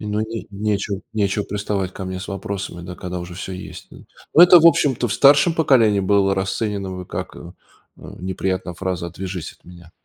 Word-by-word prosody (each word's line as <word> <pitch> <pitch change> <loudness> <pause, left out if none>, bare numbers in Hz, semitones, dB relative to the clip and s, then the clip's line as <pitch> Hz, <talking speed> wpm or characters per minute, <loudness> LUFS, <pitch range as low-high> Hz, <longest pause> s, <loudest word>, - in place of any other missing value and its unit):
И 105 - -7
ну 105 +1 -1
и 110 +1 -5
не 105 +2 -3
нечего 100 -1 -2
нечего 105 -1 0
приставать 100 -2 -3
ко 95 - -7
мне 95 0 -5
с 95 - -7
вопросами, 95 -2 -5
да 90 0 -8
когда 90 0 -5
уже 85 0 -8
всё 95 0 -6
есть, 95 +1 -9
да. - - -13 0.4
Ну 165 - +7
это, 180 0 +9
в 165 - +5
общем-то, 135 -7 +3
в - - -2
старшем 145 +4 +5
поколении 115 -11 +3
было 95 0 +2
расценено 100 0 -2
бы 90 -1 -7
как, - - -6
эм, 85 +2 -11 0.4
неприятная 95 0 -4
фраза- 90 -1 -3
отвяжись 90 -2 -6
от - - -28
меня. 85 -1 -15
95 Hz, 205 wpm, -21 LUFS, 90-105 Hz, 0.4 s, это